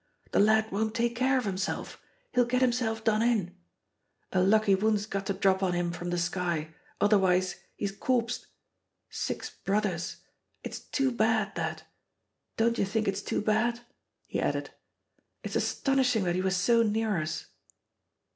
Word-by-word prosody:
The - - +2
lad 220 +1 +4
won't 215 +2 -1
take 235 0 0
care 260 +2 +2
of 250 - -1
himself 195 -1 -3 0.3
he'll 245 - +5
get 250 +1 0
himself 235 -3 0
done 215 -1 +2
in. 215 -7 +1 0.8
A 185 - +2
lucky 205 +1 +4
wound's 205 +1 +2
got 195 -2 -4
to 195 - +1
drop 190 0 +2
on 185 -2 +1
him 175 0 0
from 175 0 -5
the 175 - -1
sky, 170 -3 -1 0.3
otherwise 185 -3 +3 0.2
he's 200 - -2
corpsed. 240 +3 -1 0.6
Six - - -3
brothers 195 -4 -2 0.5
it's - - -5
too 270 -2 0
bad, 220 -3 +1
that! - - -3 0.7
Don't 230 +1 +2
you - - +3
think 215 +2 -1
it's 195 0 0
too - - -1
bad?" 235 +3 +1 0.4
He - - -3
added, - - -1 0.7
"It's - - -5
astonishing 260 -6 +1
that 175 -1 +1
he 185 - 0
was 190 0 +1
so 230 +6 +4
near 215 -4 +1
us." 155 +1 -4
210 Hz, 155 wpm, -29 LUFS, 190-230 Hz, 0.8 s, he'll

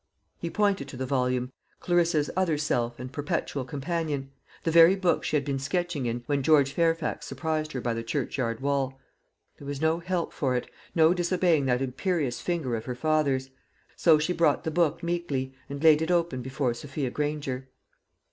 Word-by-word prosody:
He 170 - -3
pointed 200 -6 +1
to 140 - -9
the 130 - -2
volume 125 -1 0 0.3
Clarissa's 170 -4 +2
other 180 -5 +1
self 120 -5 -1
and 125 +1 -7
perpetual 145 -1 -2
companion 145 0 -3 0.3
the 165 - +1
very 170 +3 +8
book 185 -3 +1
she - - -1
had 140 -2 +1
been 140 -2 -1
sketching 165 -2 -1
in 120 +1 -3
when 145 -1 0
George 140 -1 +4
Fairfax 165 -1 0
surprised 155 -1 -2
her 125 - -3
by 120 -1 -1
the 115 - -3
churchyard 115 -1 -2
wall. 135 -1 -1 0.6
There 140 - -10
was 140 -1 -4
no 160 +2 +2
help 175 -1 -2
for 130 -3 0
it, 125 - -2 0.3
no 160 0 +6
disobeying 175 -4 +2
that 125 +1 +2
imperious 135 0 -1
finger 160 -9 -1
of 110 - -5
her 125 - -4
father's; 140 -2 +1 0.4
so 160 -3 +5
she 155 +4 0
brought 165 -4 +2
the 160 - -2
book 170 0 +1
meekly 170 -7 -2 0.2
and 140 +2 -6
laid 155 -1 +7
it 160 - -1
open 170 -7 +1
before 130 0 -1
Sophia 135 +1 -4
Granger. 145 -3 -3
145 Hz, 180 wpm, -27 LUFS, 130-165 Hz, 0.6 s, very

